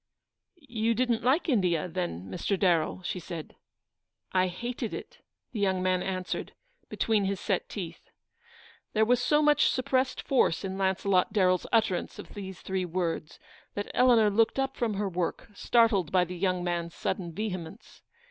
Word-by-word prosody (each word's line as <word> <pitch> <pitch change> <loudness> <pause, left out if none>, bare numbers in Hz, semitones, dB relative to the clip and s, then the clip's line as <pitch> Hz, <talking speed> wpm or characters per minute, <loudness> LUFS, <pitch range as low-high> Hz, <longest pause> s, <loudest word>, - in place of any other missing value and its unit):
"You 230 -8 -1
didn't 240 -1 +1
like 265 +10 +2
India, 180 - +2
then, 170 - -4
Mr. 190 - -1
Darrell?" 175 -1 +2
she 180 - -3
said. 165 -2 -7 0.4
" - - -38
I 185 - +2
hated 235 +5 -4
it," 485 -1 -9 0.3
the 225 - -4
young 190 -2 +1
man 185 -1 +2
answered, 185 -1 -3 0.4
between 215 -3 +1
his 195 -1 -1
set - - -1
teeth. - - -7 0.8
There 220 0 +4
was 245 +2 +3
so 295 +4 +3
much 295 -1 +5
suppressed 260 0 0
force 240 -9 +2
in 190 0 -3
Launce 190 0 0
lot 185 -2 +3
Darren's 185 -4 +2
utterance 215 -6 +1
of - - -10
these 190 -2 -7
three 190 -1 -2
words, 170 -3 -3 0.4
that 205 - -4
Eleanor 235 -4 +5
looked 225 +4 +2
up 270 0 0
from 225 -4 -1
her 200 +1 -1
work, 180 +3 -3
startled 210 -6 +3
by 180 -1 +4
the 180 +1 -7
young 180 0 0
man's 170 -1 -2
sudden 175 -4 -3
vehemence. 185 0 -6
195 Hz, 165 wpm, -29 LUFS, 180-235 Hz, 0.8 s, much